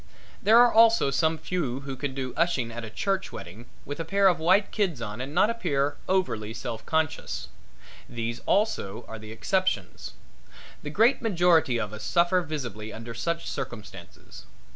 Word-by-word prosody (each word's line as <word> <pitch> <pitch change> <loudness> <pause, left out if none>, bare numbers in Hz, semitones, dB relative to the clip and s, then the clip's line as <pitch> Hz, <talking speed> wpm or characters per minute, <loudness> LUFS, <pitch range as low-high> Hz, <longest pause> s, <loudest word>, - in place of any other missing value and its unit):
There 220 +3 +6
are 240 0 +7
also 225 -9 +5
some 160 +4 +1
few 155 -7 -3
who 135 -1 -6
can 135 0 -4
do 130 -2 -4
ushing 145 -9 +1
at 120 0 -6
a 115 - -6
church 195 - -2
wedding 105 +8 -9 0.2
with 145 +2 -6
a - - -1
pair 195 +4 +3
of 175 - 0
white 185 +5 +3
kids 190 - 0
on 110 0 -5
and 135 +2 -5
not 210 +8 +3
appear 145 -11 -1
overly 115 - 0
self 115 -1 -5
conscious. 160 -1 -1 0.6
These 115 0 -4
are - - -22
also 115 - 0
the 110 0 -10
exceptions. 115 - -1 0.7
The 150 - -6
great 225 - +3
majority 175 - +3
of 105 -2 -4
us 110 - -7
suffer 175 - +3
visibly 120 - -5
under 115 +1 -8
such 170 +8 -3
circumstances. 105 -9 -8
145 Hz, 165 wpm, -27 LUFS, 115-180 Hz, 0.7 s, are